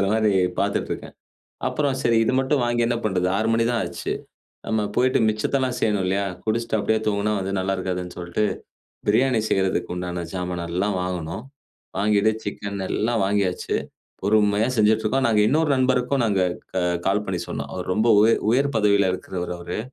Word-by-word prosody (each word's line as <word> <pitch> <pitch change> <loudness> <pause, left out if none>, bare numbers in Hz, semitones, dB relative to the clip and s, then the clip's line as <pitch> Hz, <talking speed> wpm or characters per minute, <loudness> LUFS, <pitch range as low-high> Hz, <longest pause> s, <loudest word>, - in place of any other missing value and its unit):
ஊருலங்கிற 100 - +2
மாரி 110 -2 +3 0.3
பார்த்துட்டு - - -1
இருக்கேன். - - -8 0.5
அப்புறம் 140 -3 0
சரி, 115 -1 +3
இது 130 - +1
மட்டும் 135 0 +1
வாங்கி 120 0 +1
என்ன 120 0 0
பண்ணுறது, 90 -3 +1
6 110 +2 0
மணி 115 0 +2
தான் 120 -1 0
ஆச்சு. - - -4 0.5
நம்ம 110 -1 0
போயிட்டு 130 +1 +3
மிச்சத்தெல்லாம் 125 +4 0
செய்யணும் 105 -4 +1
இல்லையா? 100 +2 0 0.2
குடிச்சிட்டு 115 +1 0
அப்டியே 110 +1 +1
தூங்கினா 105 0 +1
வந்து 95 +1 -3
நல்லா 95 +1 0
இருக்காதுன்னு 90 -1 -4
சொல்லிட்டு, 85 +4 -1 0.6
பிரியாணி 120 +3 +3
செய்றதுக்கு 95 -2 0
உண்டான 90 -1 -4
ஜாமான 90 -2 -3
எல்லாம் 95 +3 0
வாங்குனோம். 90 +2 -4 0.5
வாங்கிட்டு 105 +1 +3
சிக்கன் 100 -1 -4
எல்லாம் 115 0 0
வாங்கியாச்சு. 100 -2 0 0.5
பொறுமையா 105 +1 +3
செஞ்சுட்டு 110 0 +3
இருக்கோம். 130 +5 +1
நாங்க 110 -2 +3
இன்னொரு 155 +4 +2
நண்பருக்கும் 130 +1 +1
நாங்க 100 -4 +1 0.3
க 95 - 0 0.2
கால் 100 +2 +2
பண்ணி 90 -2 -2
சொன்னோம். - - -5
அவர் 90 0 -3
ரொம்ப 110 +4 +1
உயர் 110 +2 +4
உயர் 140 +3 +2
பதவியில 100 -2 +3
இருக்கிறவர் 90 -1 -4
அவரு. 85 +2 -5
105 Hz, 165 wpm, -23 LUFS, 95-115 Hz, 0.6 s, உயர்